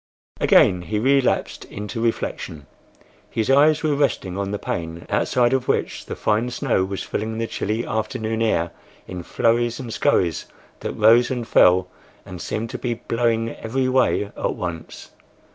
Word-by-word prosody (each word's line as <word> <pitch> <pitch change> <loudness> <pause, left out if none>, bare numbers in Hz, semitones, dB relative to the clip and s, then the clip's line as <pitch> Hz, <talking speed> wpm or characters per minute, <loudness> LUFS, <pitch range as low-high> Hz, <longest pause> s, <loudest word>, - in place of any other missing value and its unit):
Again 90 -1 +5
he 105 +5 -3
relapsed 135 +3 +1
into 105 +3 -6
reflection. 85 -9 -3 0.6
His 110 +3 0
eyes 150 +3 +5
were 155 -1 +2
resting 140 -10 0
on 100 0 -2
the 105 - -2
pane 85 -3 -5
outside 120 0 +2
of 130 -1 0
which - - -1
the - - -4
fine 110 +3 0
snow 105 -5 0
was 95 0 -4
filling 110 +1 -3
the 115 - -1
chilly 110 +1 -2
afternoon 110 0 -2
air 85 -7 +1 0.4
in 90 -1 -6
flurries 120 +5 +1
and 120 -4 -6
scurries 85 -4 +1 0.3
that - - -4
rose 120 +2 +5
and 120 -3 -3
fell 90 +1 +5 0.4
and 90 -3 -8
seemed 115 +1 -3
to - - -5
be 120 -1 -2
blowing 115 -1 0
every 130 +3 -1
way 130 -5 +2
at - - -2
once. 85 -6 -7
115 Hz, 160 wpm, -22 LUFS, 100-120 Hz, 0.6 s, Again